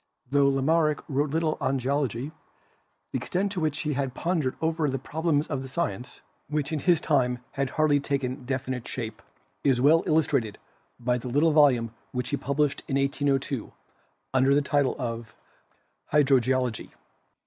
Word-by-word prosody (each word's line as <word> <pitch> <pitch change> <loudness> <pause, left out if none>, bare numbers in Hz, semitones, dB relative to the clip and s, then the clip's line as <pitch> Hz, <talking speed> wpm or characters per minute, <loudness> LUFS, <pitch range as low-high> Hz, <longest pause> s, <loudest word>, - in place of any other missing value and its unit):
Tho 140 -1 +4
Lamarck 150 +3 +2
wrote 145 +1 0
little 160 +1 0
on 135 +1 +1
Geology, 135 0 -1 0.8
the - - -1
extent 195 +2 -1
to 195 - -3
which 155 -2 -1
he 150 -2 -1
had 135 -2 -2
pon 170 -1 0
dered 130 -2 -2
over 160 -2 0
the 135 - -1
problems 155 +2 0
of 140 -3 -3
the 135 - -7
science, 130 -3 -4 0.3
which 150 0 -2
in 155 - 0
his 170 +2 +3
time 130 -6 +1
had 140 -1 -1
hardly 150 -1 +2
taken 135 -2 -2
definite 130 -1 -3
shape, 115 -3 -5 0.4
is 135 -3 +3
well 155 +6 +5
illustrated 140 -9 +1 0.4
by 125 +1 0
the 125 - -7
little 145 +6 +3
volume 130 -7 +4 0.2
which 125 0 -2
he 145 - 0
published 140 +2 0
in 135 - -1
1802 140 -2 -1 0.6
under 135 +1 +4
the 145 - +3
title 140 -2 +1
of 115 -3 -5 0.8
"Hydrogeologie." 130 -4 +2
140 Hz, 160 wpm, -27 LUFS, 130-150 Hz, 0.8 s, well